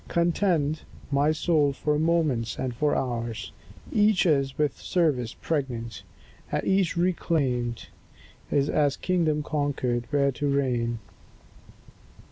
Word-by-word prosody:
Contend, 170 -3 +1 0.3
my 145 +2 +3
soul, 155 -3 +2
for 150 +2 0
moments 155 -8 +1
and 130 -2 -2
for 145 +5 +1
hours; 115 -5 -3 0.4
Each 210 -2 +3
is 140 -5 +2
with 150 -3 0
service 140 -10 0
pregnant; 125 -7 -3 0.6
each 190 -2 +1
reclaimed 140 -9 0 0.6
Is 140 0 +2
as 145 -2 +2
a - - -24
kingdom 160 -5 +1
conquered, 140 -6 -1
where 140 -1 +2
to 145 +2 -2
reign. 125 -4 0
145 Hz, 110 wpm, -26 LUFS, 125-160 Hz, 0.6 s, my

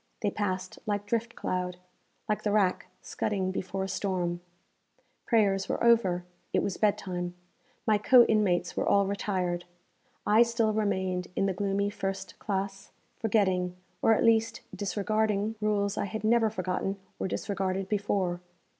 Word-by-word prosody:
They 205 - +2
passed 185 -2 -3
like 205 -1 -1
drift 230 +3 -1
cloud 180 -1 -2 0.5
like 210 -1 0
the 210 - 0
rack 200 -3 +2 0.2
scudding 190 -2 -1
before 190 0 -3
a - - -2
storm. 180 -3 -1 0.9
Prayers 200 -4 +2
were - - -1
over; 195 -7 +4 0.3
it - - +2
was 200 - -1
bed 210 -2 +3
time; 180 -2 -4 0.5
my 215 -2 +3
co 245 +3 +7
inmates 185 -5 +1
were - - 0
all 200 0 +4
retired. 185 -3 -1 0.6
I 215 +2 +5
still 230 -2 +2
remained 190 -4 0
in - - +2
the 195 - +1
gloomy 200 +1 0
first 195 -1 -4
classe, 195 -1 -3 0.3
forgetting, 190 -5 +1 0.3
or 225 - +5
at - - +1
least 230 +2 +3
disregarding, 210 +1 0
rules 205 -1 +1
I - - 0
had 215 +2 -5
never 225 0 +4
forgotten 195 -1 -2 0.2
or - - -1
disregarded 195 0 -2
before. 195 -4 0
200 Hz, 145 wpm, -29 LUFS, 185-215 Hz, 0.9 s, co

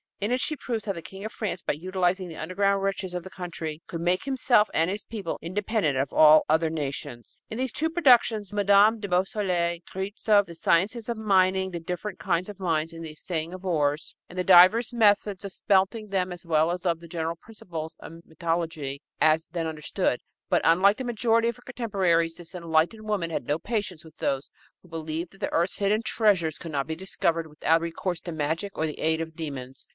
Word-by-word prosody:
In 205 +3 -1
it 250 - +2
she 310 - 0
proves 235 -6 -4
how 200 - -1
the 170 - -7
King 195 +5 -9
of 220 - -4
France, 185 -5 -4
by - - 0
utilizing 185 +3 -1
the 165 - -9
underground 195 +4 0
riches 195 -2 -2
of 180 - -3
his 190 - -11
country, 165 -4 -5
could 165 - -5
make 175 +2 +1
himself 250 -5 +3
and 165 +2 +2
his 205 +2 -3
people 205 -7 -5
independent 190 - -1
of 135 +1 -1
all 155 0 +7
other 160 +1 +2
nations. 140 -6 -6
In 220 - -5
these 260 -1 -1
two 320 +7 -1
productions 240 - +3
Mme. 205 +2 +5
de 205 - -4
Beausoleil 180 -2 0
treats 195 +4 -6
of 205 -1 +6
the 170 - -10
science 170 +6 +2
of 235 - -2
mining, 190 -3 +2
the 170 - -4
different 180 +5 -5
kinds 180 0 0
of 205 -1 -9
mines, 165 -3 0
the 165 -1 -7
assaying 160 +1 -4
of 185 +1 -9
ores 150 -3 0
and 180 - -11
the 180 - +1
divers 185 +7 +7
methods 205 -4 +3
of 200 - -5
smelting 200 +3 +1
them, 185 -2 0
as 175 0 -8
well 160 -1 +3
as 180 +1 -4
of 170 -2 +1
the 170 - -12
general 165 0 -3
principles 170 -5 -8
of 165 +1 -11
metallurgy, 160 -4 -3 0.2
as 160 +1 +3
then 165 0 -3
understood. 155 -2 -1 0.3
But, - - +3
unlike 185 +5 +5
the 260 - -4
majority 230 -1 +2
of 235 - -1
her - - -18
contemporaries, 190 -9 0
this 175 0 -11
enlightened 170 +5 0
woman 190 -6 -1
had - - -3
no 145 - 0
patience 195 -5 -3
with 160 - -16
those 135 0 -2 0.3
who - - -18
believed 165 +1 -4
that 195 - -18
the - - -2
earth's 170 +3 +1
hidden 205 +2 +1
treasures 190 -10 +2
could 165 - -7
not 140 -2 -1
be 160 - -3
discovered 165 -2 -1
without 160 +2 +1
recourse 170 +1 -3
to 175 - -6
magic 160 +6 -3
or - - 0
to - - 0
the 150 - -7
aid 160 0 +1
of 160 -1 -5
demons. 135 -5 -7
180 Hz, 210 wpm, -26 LUFS, 160-205 Hz, 0.3 s, all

